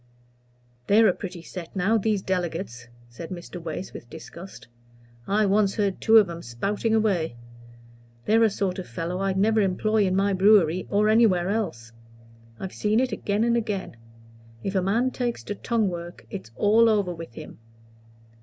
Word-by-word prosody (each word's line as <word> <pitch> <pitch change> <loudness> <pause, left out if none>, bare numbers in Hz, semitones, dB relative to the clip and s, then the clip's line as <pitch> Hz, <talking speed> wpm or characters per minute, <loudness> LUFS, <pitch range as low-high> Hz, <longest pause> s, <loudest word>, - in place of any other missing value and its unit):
"They're 220 +2 +6
a 185 - +3
pretty 180 -3 -8
set, 175 +1 -9
now, 195 +4 +2
these 210 -2 0
delegates," 175 -9 -3 0.2
said 120 +8 -9
Mr. 175 -1 -8
Wace, 165 +3 -6
with 120 - -10
disgust. 170 +3 -11 0.6
"I 210 +2 +2
once 200 0 +2
heard 200 -3 -1
two 225 0 +6
of 210 -3 +6
'em 170 0 -7
spouting 200 - -1
away. 185 - +1 0.9
They're 225 +2 +3
a 225 - +5
sort 195 -2 -2
of 185 - -7
fellow 165 +9 -4
I'd 195 -1 -1
never 215 +2 +3
employ 205 +2 +1
in 185 - 0
my 200 +1 +2
brewery, 185 -3 +4
or 210 +1 +2
anywhere 215 -5 +3
else. 160 - -3 0.7
I've 190 - -6
seen 215 +2 +1
it 255 -1 0
again 205 +2 -1
and 235 0 +2
again. 210 - -3 0.7
If 195 - -2
a 190 - +2
man 230 +7 +1
takes 245 -2 -3
to - - -4
tongue 225 +1 0
work 175 0 -8
it's 190 - -7
all 225 +2 +4
over 200 -5 +1
with 165 -7 -9
him. - - -10
195 Hz, 170 wpm, -25 LUFS, 175-215 Hz, 0.9 s, They're